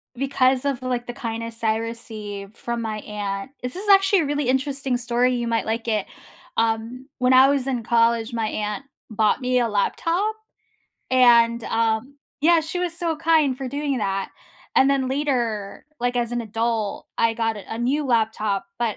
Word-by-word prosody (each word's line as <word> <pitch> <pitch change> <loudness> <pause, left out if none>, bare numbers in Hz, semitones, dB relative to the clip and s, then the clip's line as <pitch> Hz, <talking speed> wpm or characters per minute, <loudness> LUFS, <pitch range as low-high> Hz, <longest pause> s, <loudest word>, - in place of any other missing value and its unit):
because 265 0 +1
of, 275 -3 -1
like, 250 -1 -2
the 245 - -4
kindness 230 -1 -5
I 220 0 +2
receive 215 -3 -6
from 235 0 -4
my 220 -2 -3
aunt 205 +2 -5
this 250 +7 -4
is, 410 +3 -5
actually, 390 0 +6
a 320 - +1
really 290 -2 -1
interesting 265 -1 0
story, 245 +1 +1
you 240 -1 -2
might 230 -1 0
like 225 +1 -2
it. 215 -3 0 0.5
Um, 230 +3 -1
when 250 0 +3
I 260 +1 +8
was 280 -2 +1
in 260 -3 -1
college, 230 0 +2
my 225 -2 -1
aunt 210 +3 -3 0.3
bought 215 0 +2
me 250 -1 +1
a 235 -1 +1
laptop, 335 - 0 0.8
and, 235 -2 +5
um 225 +4 0 0.3
yeah, 335 +2 +6
she 320 +3 -4
was 355 -2 -1
so 335 -2 0
kind 315 -4 +3
for 265 -1 -5
doing 285 0 -2
that, 195 -2 -1 0.5
and 270 - +6
then, 270 -2 +1
later, 245 -8 -2
like, 245 +1 0
as 240 -1 0
an 240 0 -1
adult, 225 -1 -2
I 230 0 +3
got 225 -1 -1
a 205 - -7
a - - -5
new 270 +5 0
laptop, 220 -5 0
but 235 -3 -1
240 Hz, 180 wpm, -23 LUFS, 225-270 Hz, 0.8 s, I